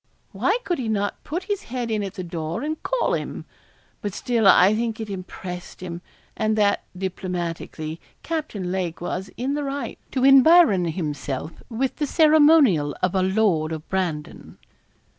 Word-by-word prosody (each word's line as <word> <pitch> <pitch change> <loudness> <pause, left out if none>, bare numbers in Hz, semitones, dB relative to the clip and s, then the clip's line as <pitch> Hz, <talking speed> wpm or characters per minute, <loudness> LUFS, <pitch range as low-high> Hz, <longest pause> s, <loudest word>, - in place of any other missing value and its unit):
Why - - +1
could 355 -5 -1
he 245 - -2
not 205 -2 -2
put 345 +5 -4
his 405 +1 -3
head 240 -1 -3
in 215 -1 0
at 195 -1 -5
the 185 - -5
door 165 - -4
and 310 +1 -3
call - - 0
him? - - -4 0.6
But 205 -2 -4
still 230 -4 +1
I 190 +1 +7
think 225 0 -2
it 220 -2 -5
impressed 180 -1 -7
him, 175 -1 -6 0.3
and 215 0 0
that, 205 -1 +2
diplomatically, 175 -4 -4 0.2
Captain 295 - -3
Lake 180 -3 -2
was 185 +2 -4
in 260 +4 -1
the 295 0 -2
right 275 -3 -4
to 260 - 0
environ 275 - +7
himself 155 -3 -4
with 255 +3 -2
the 295 - -1
ceremonial 295 - +5
of 185 - +2
a 190 - +2
lord 185 -5 +2
of 160 0 -6
Brandon. 170 -6 -3
200 Hz, 160 wpm, -23 LUFS, 175-270 Hz, 0.6 s, I